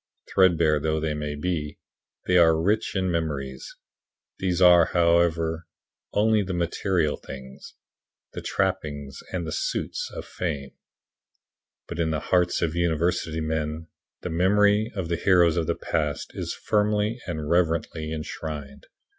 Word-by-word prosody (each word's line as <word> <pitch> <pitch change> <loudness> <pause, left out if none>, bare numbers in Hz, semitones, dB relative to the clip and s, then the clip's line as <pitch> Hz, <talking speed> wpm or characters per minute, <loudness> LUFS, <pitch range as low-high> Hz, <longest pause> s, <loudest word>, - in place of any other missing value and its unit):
Threadbare 85 -5 +4
though 80 +1 0
they 80 0 -1
may 75 0 -4
be, 75 -2 -3 0.5
they 90 - +2
are 80 -2 +6
rich 105 +7 0
in 95 -2 0
memories. 70 -6 -3 0.6
These 90 -2 0
are, 90 -2 +7
however, 85 -1 +2 0.4
only 110 +1 +3
the 95 -2 -3
material 85 -2 0
things 65 0 -11 0.6
"the - - -5
trappings 70 -2 -2
and 90 -2 -2
the 80 - -4
suits" - - -2
of - - -7
fame 75 -6 -4 1.2
but 85 - -6
in 80 -1 +1
the 80 -1 -1
hearts 90 -1 +3
of 80 -2 0
university 85 -1 0
men 80 +1 -3 0.3
the - - -4
memory 105 +5 +3
of 95 -4 -3
the 85 0 -1
heroes 85 -3 +4
of 85 -2 0
the - - +1
past 75 -3 -2
is - - -4
firmly 105 +2 0
and 80 -4 -4
reverently 80 -2 0
enshrined. 75 -3 -6
85 Hz, 140 wpm, -25 LUFS, 75-90 Hz, 1.2 s, are